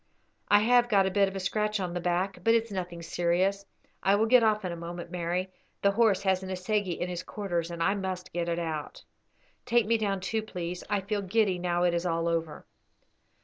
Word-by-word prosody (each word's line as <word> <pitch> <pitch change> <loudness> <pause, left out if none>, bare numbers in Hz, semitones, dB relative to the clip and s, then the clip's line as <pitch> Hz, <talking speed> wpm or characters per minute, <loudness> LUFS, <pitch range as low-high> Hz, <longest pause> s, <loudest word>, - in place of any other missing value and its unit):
"I 205 0 +5
have 245 +2 +4
got 195 -3 +4
a 190 - 0
bit 200 +1 +3
of 195 - -6
a - - -2
scratch 210 +2 -1
on 180 -2 -3
the 175 - -2
back, 180 +2 -1
but 230 0 +4
it's 230 -1 0
nothing 175 -3 -5
serious. 185 +4 0 0.3
I 195 - +4
will 215 +2 +3
get 250 +2 +6
off 215 -2 +2
in 180 - -2
a - - -4
moment, 170 0 -7
Mary; 180 +1 -2 0.3
the 200 - +5
horse 200 -2 +3
has 190 -1 +2
an 190 - -7
assegai 190 0 -1
in 175 - -1
his 180 -1 -4
quarters, 175 -6 -3
and 170 -1 -3
I 195 - +3
must 190 -2 -4
get 170 0 -1
it 170 - -1
out." 160 -3 -4 0.6
"Take 240 -2 +2
me 230 +1 +2
down, 200 -2 0
too, 220 +4 -2
please; 180 -4 -5
I 205 -1 +1
feel 205 +1 -2
giddy 195 -1 +1
now 175 0 0
it 175 -1 +3
is 170 +1 -1
all 165 0 0
over." 165 -2 -2
190 Hz, 225 wpm, -28 LUFS, 175-205 Hz, 0.6 s, get